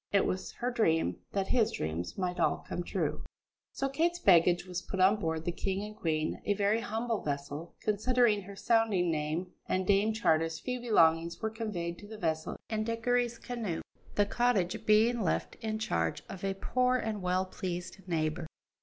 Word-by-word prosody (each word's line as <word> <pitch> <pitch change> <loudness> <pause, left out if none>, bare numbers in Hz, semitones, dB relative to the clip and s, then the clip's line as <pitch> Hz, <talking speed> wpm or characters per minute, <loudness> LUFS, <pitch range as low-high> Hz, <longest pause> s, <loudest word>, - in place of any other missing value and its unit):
It 200 - +4
was 185 +1 -2
her 245 +1 -2
dream, 165 - +2
that 195 -1 -1
his 225 -3 +3
dreams 80 +3 -3
might 180 -2 -2
all - - +1
come - - -3
true. - - -2 0.5
So 275 - -1
Kate's 330 +6 +1
baggage 175 - +5
was 180 -1 -4
put 190 - -5
on 190 +3 +5
board 160 -4 -2
the 175 - +1
King 195 +3 -2
and 210 0 -7
Queen, 155 -5 -1
a 205 - +1
very 205 +2 +2
humble 230 -1 -2
vessel 145 +3 -4
considering 215 0 +3
her 200 +1 -10
sounding 210 -6 +2
name, 155 +4 -2 0.2
and 185 0 0
Dame 205 +3 +3
Charter's 165 -7 +1
few 250 -1 -3
belongings 170 -8 +3
were 220 -1 -2
conveyed 190 -7 -4
to 205 - -11
the 220 +1 -8
vessel 160 -5 -2
in 215 -1 -1
Dickory's 235 +1 0
canoe, 225 -11 -4 0.3
the 205 - +4
cottage 220 -3 +1
being 225 +3 +4
left 185 - 0
in 215 -1 -2
charge 85 - -1
of 190 - -8
a 195 0 0
poor 250 +5 +1
and 220 -4 -3
well 180 +1 +1
pleased 180 0 -5
neighbour. 160 -1 -1
195 Hz, 180 wpm, -31 LUFS, 170-225 Hz, 0.5 s, baggage